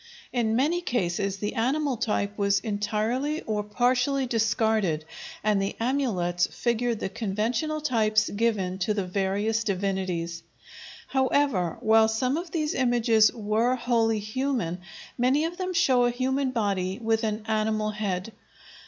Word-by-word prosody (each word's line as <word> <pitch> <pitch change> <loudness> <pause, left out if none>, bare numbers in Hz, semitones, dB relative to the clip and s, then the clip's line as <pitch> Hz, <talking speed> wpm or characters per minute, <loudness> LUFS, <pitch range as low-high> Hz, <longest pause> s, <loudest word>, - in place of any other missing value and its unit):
In 225 -3 +1
many 310 +8 +1
cases 200 - -1
the 210 +1 -3
animal 270 +4 0
type 210 -2 -1
was 200 -1 +2
entirely 225 +8 -1
or 215 -1 -1
partially 250 +5 +1
discarded 220 -8 +1 0.4
and 210 -2 +2
the 195 - -2
amulets 205 -9 0
figured 235 -1 -1
the - - -2
conventional 230 +10 -2
types 215 -7 +2
given 200 -4 0
to 210 +3 0
the 200 -3 -1
various 200 +4 0
divinities. 185 -4 -2 0.7
However, 265 - +1
while 220 0 +5
some 250 +5 0
of 340 +2 -4
these 315 -2 -1
images 235 -4 +3
were 225 +2 0
wholly 235 -2 +1
human, 215 -4 -2 0.4
many 265 +5 +3
of 340 +2 -4
them 370 -1 -2
show 255 -8 +3
a - - +3
human 260 +2 0
body 200 -6 -1
with 225 -1 0
an 215 0 -2
animal 215 -1 0
head. 205 0 -3
220 Hz, 135 wpm, -26 LUFS, 205-255 Hz, 0.7 s, while